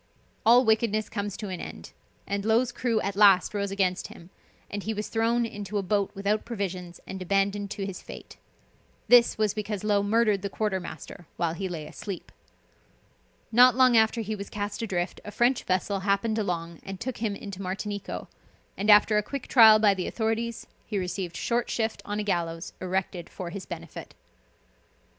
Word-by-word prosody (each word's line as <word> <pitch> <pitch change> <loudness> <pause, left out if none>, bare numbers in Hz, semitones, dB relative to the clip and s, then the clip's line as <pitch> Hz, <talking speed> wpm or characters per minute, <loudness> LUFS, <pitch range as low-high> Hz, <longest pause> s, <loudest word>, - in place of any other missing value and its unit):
All 245 +2 +7
wickedness 220 -1 +2
comes 205 -2 -4
to 210 - -5
an 185 -2 -5
end - - -9 0.3
and 200 0 -2
Low's 230 +3 +2
crew 235 -3 0
at 200 0 -3
last 200 -2 +5
rose 200 -1 -1
against 190 -2 0
him 170 +2 -14 0.4
and 205 - -5
he 220 +2 -3
was 210 +1 -4
thrown 230 +1 +1
into 205 -2 -5
a 200 - 0
boat 200 +1 +1
without 200 +2 0
provisions 185 -6 -5
and 190 0 -7
abandoned 200 +2 0
to 200 -1 -4
his 195 -2 -6
fate. - - -11 0.7
This 245 -1 +6
was 215 -2 +1
because 210 -1 -4
Low 205 -1 +2
murdered 210 -1 +2
the 200 - -3
quarter 205 -1 -1
master 175 -1 -9
while 170 -2 0
he 190 +2 -4
lay 160 -4 -5
asleep. 185 +3 -7 1.2
Not 245 +1 +7
long 255 -2 +5
after 220 +1 +4
he 215 0 -3
was 200 -1 -7
cast 205 0 -4
adrift 185 -5 -2
a - - -7
French 240 +4 +1
vessel 190 +2 0
happened 200 +3 0
along 170 -4 -3
and 195 -1 -8
took 255 +1 -4
him 215 -3 -2
into 200 -2 -8
Martinico, 200 +2 -4 0.5
and 205 +2 -2
after 210 +1 +7
a - - +1
quick 275 +5 -6
trial 220 -4 +8
by 210 -2 +4
the 185 -2 -3
authorities 225 +1 -2 0.2
he 210 - -4
received 180 -2 -3
short 240 0 -1
shift 220 -1 -1
on 205 0 -3
a - - -1
gallows 170 -4 -2
erected 185 -2 -3
for 175 -2 -7
his 195 0 -7
benefit. - - -8
205 Hz, 180 wpm, -27 LUFS, 190-220 Hz, 1.2 s, trial